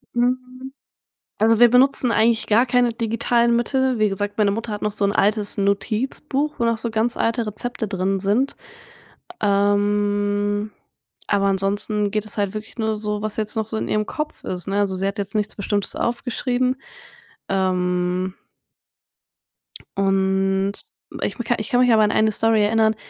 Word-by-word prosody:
Hm. 255 +2 -2 0.7
Also, 225 +1 +3
wir 240 0 +7
benutzen 250 0 +5
eigentlich 225 +1 +2
gar 230 +4 +3
keine 245 -1 +2
digitalen 235 +1 +1
Mittel. 260 +1 0
Wie 215 0 +3
gesagt, 205 +1 -3
meine 210 -2 +2
Mutter 225 +2 -4
hat 205 - -5
noch 210 - -1
so 205 - +1
'n 200 - 0
altes 205 0 +1
Notizbuch, 260 +9 -1
wo 235 - 0
noch 230 0 +2
so 230 +1 -3
ganz 225 +2 0
alte 230 0 0
Rezepte 220 +1 -3
drin 190 0 -1
sind. 215 +8 0 0.8
Ähm, 205 0 +1 0.6
aber 200 -1 +1
ansonsten 200 +2 +1
geht 215 0 -2
es 210 - -4
halt 200 -2 0
wirklich 215 0 -8
nur 220 -1 -1
so, 210 -1 -2
was 215 -1 -4
jetzt 215 0 -3
noch 220 -1 -2
so 220 - -3
in - - -3
ihrem 215 0 0
Kopf 300 +4 -5
ist, 180 -1 -1
ne? 200 +1 0
Also, 195 -2 0
sie 190 +1 -2
hat 200 +2 -3
jetzt 200 0 -4
nichts 215 0 -2
Bestimmtes 205 0 -2
aufgeschrieben. 250 +1 -1 0.7
Ähm 180 -1 0 1.6
Und, 195 0 +1 0.5
ich - - -2 0.2
ich 215 - -5
kann 245 - +3
mich 250 -1 +4
aber 220 -1 +5
an 210 - +2
eine 215 0 +2
Story 220 0 +2
erinnern. 220 +1 +2
215 Hz, 165 wpm, -21 LUFS, 200-235 Hz, 1.6 s, wir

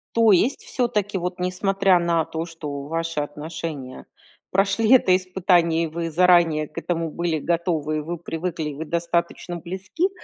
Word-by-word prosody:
То 225 -2 +5
есть, 225 +9 +2
всё-таки, 210 -5 -1
вот, 180 0 -4
несмотря 190 0 +2
на 170 -2 +1
то, 160 +1 -4
что 150 -4 -6
ваши 165 +1 -3
отношения 150 -2 -6 0.5
прошли 200 +5 +3
это 185 -8 +6
испытание, 180 -3 +2
и 165 - -1
вы 165 +1 -4
заранее 170 -3 +4
к 155 - -26
этому 165 -1 -2
были 170 -1 -1
готовы, 165 -2 -1
и - - 0
вы 170 +3 -4
привыкли, 165 -1 -4
и 145 - -6
вы 160 +3 -6
достаточно 170 +1 -2
близки, 190 - -2
170 Hz, 160 wpm, -23 LUFS, 160-185 Hz, 0.5 s, это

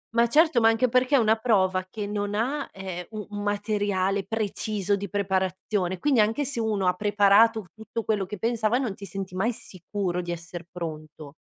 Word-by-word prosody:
Ma 235 0 +5
certo, 305 -1 +4
ma 225 - +6
anche 225 +2 +2
perché 255 +3 +3
è - - +7
una 220 -2 +3
prova 190 -5 +1
che 210 -1 -5
non 205 0 -2
ha, 270 +6 -1
ehm, 185 -2 -6
u 215 -2 -6
un 205 - -4
materiale 205 -2 0
preciso 205 -1 -1
di 200 -1 -5
preparazione, 190 -1 -1
quindi 270 +4 +2
anche 225 +7 +2
se 265 -4 -4
uno 215 -4 0
ha 180 - +4
preparato 210 +2 +4
tutto 220 +1 -6
quello 205 -4 0
che 210 - -6
pensava, 230 +1 +1
non 245 -7 -1
ti 200 - -10
senti 190 +1 -6
mai 195 +6 +1
sicuro 185 -2 -4
di 175 0 -5
esser 170 0 -7
pronto. 155 -4 -7
205 Hz, 190 wpm, -26 LUFS, 185-225 Hz, -, è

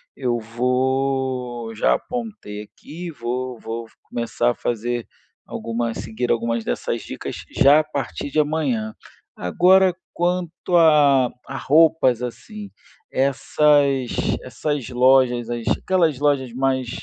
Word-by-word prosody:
eu 120 -3 -1
vou 125 0 -1
já 110 - +3
apontei 215 - -6
aqui, 165 +10 -9
vou 125 -2 -4
vou 115 +1 -5 0.2
começar 120 +1 -1
a - - -6
fazer 120 0 -2 0.4
alguma 115 +1 -3
a - - -5
seguir 115 +3 -4
algumas 115 0 0
dessas - - -2
dicas - - -7
já 140 +2 +6
a - - -7
partir 140 - -5
de 155 - +1
amanhã. 140 -8 -1 0.4
Agora 185 - +4 0.2
quanto 175 0 -1
à 145 -6 +5 0.2
à 135 - -5
roupas 145 -4 +3
assim, 205 - -7 0.4
essas 140 -1 +2 0.3
essas 130 +2 -3
lojas, 125 -1 +3
as 120 -1 -4
aquelas 170 -7 +1
lojas 140 -4 +1
mais, 130 -1 0
130 Hz, 120 wpm, -22 LUFS, 120-150 Hz, 0.4 s, já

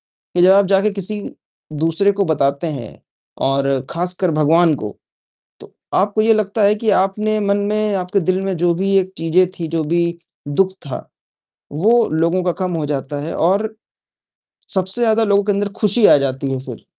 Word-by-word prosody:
कि 175 - -3
जब 185 +2 +6
आप 200 0 +5
जाके 195 +2 +2
किसी 205 +2 -4 0.5
दूसरे 165 +6 +1
को 200 0 -1
बताते 140 0 0
हैं 130 -8 -7 0.5
और 135 0 +1 0.2
खासकर 180 +1 -2
भगवान 155 +2 +3
को, 105 -6 -5 0.7
तो - - -14 0.2
आपको 205 +2 +2
ये 225 +1 +4
लगता 215 0 0
है 205 - +4
कि 220 +1 -2
आप 195 -1 +3
अपने 215 +2 -2
मन 200 -1 +1
में 210 0 -1
आपके 185 +2 0
दिल 185 +1 0
में 195 -1 -2
जो 175 0 +2
भी 195 +2 0
एक 185 0 -3
चीज़ें 165 +3 +2
थी, 165 - -3
जो 160 0 -2
भी 170 +2 0 0.3
दुःख 190 +7 +1 0.2
था, 130 - -6 0.6
वो 225 +10 +3
लोगों 170 +3 +1
का 180 - +1
कम 180 - -3
हो 155 -2 -2
जाता 145 0 -4
है 165 - -4
और 200 +6 +1 1.0
सबसे 190 +4 -1
ज़्यादा 225 -1 +3
लोगों 200 -1 +3
के 205 - +1
अंदर 205 +1 -1
खुशी 210 +1 +3
आ - - +7
जाती 135 0 -2
है 135 - -2
फिर 125 -4 -9
185 Hz, 185 wpm, -18 LUFS, 160-205 Hz, 1.0 s, आ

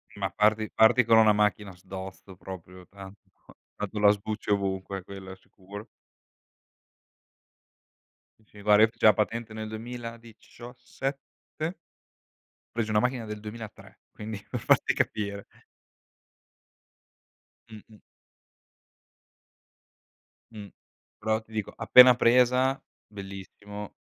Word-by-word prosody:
Ma 95 -2 -2
parti 105 +3 +1
parti 120 +2 +5
con 115 -1 +5
una 110 -1 +6
macchina 105 -2 0
sdosto 95 +1 -10
proprio 90 -1 -11
tranto 100 0 -14 0.4
tanto 105 +1 -5
la 105 0 +6
sbucci 105 +1 -4
ovunque, 95 -1 -2
quello 95 -1 -10
è - - -9
sicuro. 100 +3 -12 2.5
Uhm, 110 - -28
sì, 105 -1 -16
guarda, 105 +1 +5
io 110 - +5
feci - - -3
la 105 - +8
patente 110 +1 -2
nel 110 0 -6
duemiladicioassette? 120 - -8 0.9
Presi 115 -2 -3
una 105 0 +3
macchina 125 -1 -1
del 105 -1 -7
2003, 110 0 -10
quindi 105 -1 -8
per - - -3
farti - - +3
capire. 100 -1 -2 2.3
Mh-mh. 110 0 -14 2.5
Mh. 105 -2 -9 0.5
Però 110 0 0
ti 110 - -24
dico, 110 -2 -4
appena 125 +2 +8
presa, 125 +2 +3 0.3
bellissimo, 100 +1 -10
105 Hz, 105 wpm, -27 LUFS, 100-115 Hz, 2.5 s, la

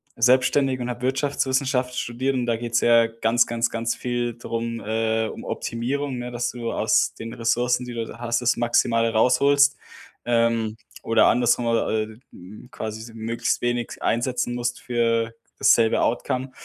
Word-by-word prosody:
selbstständig 130 +2 +3
und 125 0 -3
habe 120 +1 -6
Wirtschaftswissenschaft 130 -1 0
studiert 130 +3 -2
und 125 -2 -1
da 115 - +2
geht's 120 0 -1
ja 115 -1 +5
ganz, 115 +1 +1
ganz, 115 0 -1
ganz 115 0 -2
viel 120 -1 -2
drum 115 -1 -4
äh, 110 +1 0
um - - -8
Optimierung, 130 +3 -3
ne, 120 0 -5
dass 120 0 -2
du 120 -2 -4
aus - - +2
den 115 0 -8
Ressourcen, 120 +2 0
die 125 - -7
du 115 -1 -5
hast, 120 0 -1
das 120 0 +2
Maximale 115 -1 +2
rausholst. 140 +5 +4 0.5
Ähm, 115 -2 +1 0.3
oder 115 -1 +4
andersrum 120 0 +2
äh, 115 -1 +1
äh, - - -17
hm, 100 +7 -13
quasi 110 0 -6
so 115 0 -11
möglichst 115 +1 -2
wenig 120 -1 -2
einsetzen 120 0 -1
musst 120 0 -3
für 115 -2 0 0.3
dasselbe 115 -1 +4
Outcome. 130 +2 -1
120 Hz, 160 wpm, -23 LUFS, 115-125 Hz, 0.5 s, ja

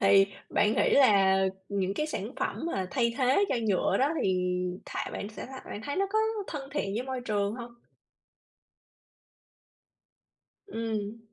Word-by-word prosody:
Thì 195 0 +6 0.2
bạn 210 +1 +3
nghĩ - - +3
là 200 -8 +6 0.3
những 195 -1 -1
cái 305 - -1
sản 310 - -4
phẩm - - -2
mà 190 - -1
thay 235 -3 +1
thế 265 +9 +4
cho - - +1
nhựa 190 -3 +2
đó, 275 +3 +3
thì 180 -1 +1 0.3
thà - - -4
bạn 200 - -4
sẽ 215 - -8
thà 265 0 -9
bạn 205 - -5
thấy 285 - -3
nó 395 - +2
có 435 - +2 0.3
thân 275 -3 -6
thiện 200 -9 -1
với 230 - -1
môi 260 -1 -4
trường 205 -3 -1
hông? 235 -1 -8 2.9
Ừm. 225 - -3
225 Hz, 160 wpm, -29 LUFS, 200-265 Hz, 2.9 s, Thì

